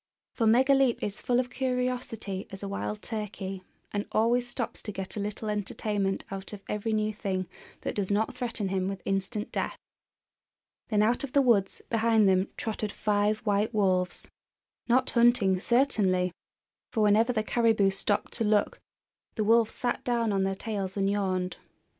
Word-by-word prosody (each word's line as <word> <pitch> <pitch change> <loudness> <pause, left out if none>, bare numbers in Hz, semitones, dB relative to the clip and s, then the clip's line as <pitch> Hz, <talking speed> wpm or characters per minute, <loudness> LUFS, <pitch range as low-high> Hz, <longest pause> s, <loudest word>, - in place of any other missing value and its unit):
For 225 - +1
Megaleep 265 +2 +4
is 205 0 -4
full 245 0 +2
of 250 0 -2
curiosity 250 -6 -2
as 195 +1 -9
a - - -3
wild 205 +1 -4
turkey, 200 -4 -4 0.3
and 205 0 -2
always 240 +3 +2
stops 240 -1 -4
to 210 - -5
get 190 -1 -6
a - - -3
little 210 +2 -4
entertainment 205 -1 -2
out 195 +1 -6
of 200 -1 -9
every 210 +2 -2
new 215 0 0
thing 190 -3 -2 0.3
that - - -3
does 200 -3 -2
not 210 +2 +1
threaten 230 -5 -2
him 190 -1 0
with 195 -1 -5
instant 195 +3 -2
death. - - -2 1.1
Then 210 -2 +3
out 235 +5 +2
of 275 - -5
the 280 - +5
woods 220 -6 +2
behind 225 -2 +3
them 190 +1 +3
trotted 215 -1 -3
five 210 +1 +1
white 210 +2 +1
wolves, 185 -3 +1 0.6
not 255 +2 +3
hunting, 235 -6 +4
certainly! 195 -7 +2 0.6
for 225 - 0
whenever 215 +4 +4
the 215 -3 0
caribou 220 -4 +3
stopped 200 +1 -1
to 230 - +3
look 210 -1 +2 0.6
the 215 - 0
wolves 225 +1 +3
sat 245 -1 -2
down 235 -3 +1
on 195 - +1
their 195 0 0
tails 195 -2 -4
and 195 0 +2
yawned. 185 -3 -1
210 Hz, 165 wpm, -28 LUFS, 195-230 Hz, 1.1 s, the